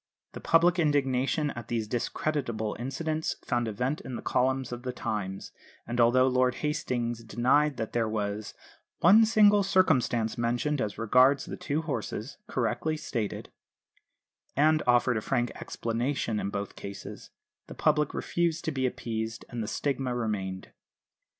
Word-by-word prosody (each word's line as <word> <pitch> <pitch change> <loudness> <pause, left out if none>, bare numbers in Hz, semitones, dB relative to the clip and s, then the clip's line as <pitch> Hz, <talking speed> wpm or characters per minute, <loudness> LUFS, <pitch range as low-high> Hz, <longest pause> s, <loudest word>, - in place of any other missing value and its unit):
The - - -8
public 175 +2 +4
indignation 145 -1 +1
at 120 - -8
these 115 -2 -2
discreditable 120 -2 -2
incidents 155 +5 -2
found 120 -3 0
a - - -2
vent 125 +8 -2
in 130 - -6
the - - -6
columns 130 0 0
of 120 0 -5
the 125 0 -3
Times; 95 -5 -4 0.3
and 120 +1 0
although 125 +2 +5
Lord 130 -1 +2
Hastings 120 -6 -2
denied 130 +5 +2
that 110 -2 -4
there 115 -2 +1
was 105 0 -3 0.5
"one 215 +6 +7
single 210 -2 +5
circumstance 135 - +2
mentioned 120 +5 0
as 105 -2 -3
regards 125 +5 +4
the - - -6
two 150 +3 -2
horses, 130 - -4
correctly 155 0 -1
stated," 115 -8 -4 1.0
and 155 +2 +4
offered 120 -1 +4
a - - -1
frank 120 0 0
explanation 115 -1 -2
in 100 - -2
both 100 -1 -4
cases, 100 0 -8 0.4
the - - -9
public 150 -1 +2
refused 170 -1 -1
to 160 - 0
be 130 -2 0
appeased, 110 -2 -4
and 120 -2 -4
the 110 - -3
stigma 135 -1 -1
remained. 100 -5 -3
125 Hz, 150 wpm, -28 LUFS, 115-150 Hz, 1.0 s, one